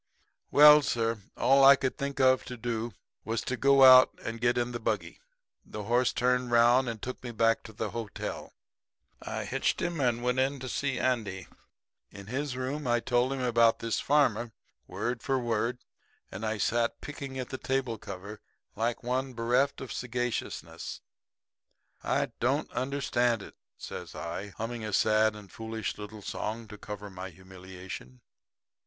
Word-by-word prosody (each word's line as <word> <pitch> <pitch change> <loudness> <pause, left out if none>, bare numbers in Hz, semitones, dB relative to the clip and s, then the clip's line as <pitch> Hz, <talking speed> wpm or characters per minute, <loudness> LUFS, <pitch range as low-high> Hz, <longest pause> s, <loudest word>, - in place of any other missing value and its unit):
"Well, 150 +1 +9
sir, 115 -5 -1 0.2
all 135 +3 +5
I 140 +1 +10
could 130 -1 -2
think 140 -1 -4
of 130 -1 +4
to 125 - -7
do 115 -2 -3 0.3
was 115 0 -2
to 130 - -3
go 135 +1 +5
out 130 0 +9
and 115 0 -5
get 120 0 +2
in 120 0 0
the 120 - -4
buggy. 110 - -2 0.4
The 105 - -7
horse 120 +4 +2
turned 125 0 +1
round 120 +2 +4
and 115 -2 -5
took 130 +4 -6
me 125 - -5
back 115 0 +2
to 110 - -9
the 110 0 -4
hotel. 115 -3 -6 0.7
I - - -4
hitched - - 0
him 170 -2 -2
and 120 -2 +1
went 125 +1 +1
in 135 +2 +1
to 130 - -5
see 135 +1 -1
Andy. 105 -8 -1 0.6
In 100 -1 -11
his 130 +4 -3
room 130 +2 -3
I 120 0 +3
told 120 +2 +1
him 135 -1 -2
about 115 -2 +4
this 115 -2 -2
farmer, 120 -6 +2 0.3
word 120 0 -3
for 135 +1 0
word; 120 0 -1 0.5
and 95 - -7
I 110 0 -1
sat 115 +3 0
picking 140 -2 -7
at 130 -2 -4
the 130 - -5
table 130 -4 -1
cover 100 +2 -8 0.3
like 115 +3 -1
one 130 +2 -1
bereft 125 +4 +1
of 130 - -6
sagaciousness. 120 -9 -4 1.0
"'I - - 0
don't - - 0
understand 125 -3 0
it,' - - -12 0.2
says - - -8
I, 100 - -5
humming 115 +1 -4
a 105 -1 -4
sad 110 +1 +3
and 105 -3 -12
foolish 110 -2 -5
little 105 0 -8
song 110 +3 -4
to 105 - -9
cover 105 -1 -7
my 95 0 -7
humiliation. 90 -7 -10
120 Hz, 165 wpm, -29 LUFS, 110-130 Hz, 1.0 s, I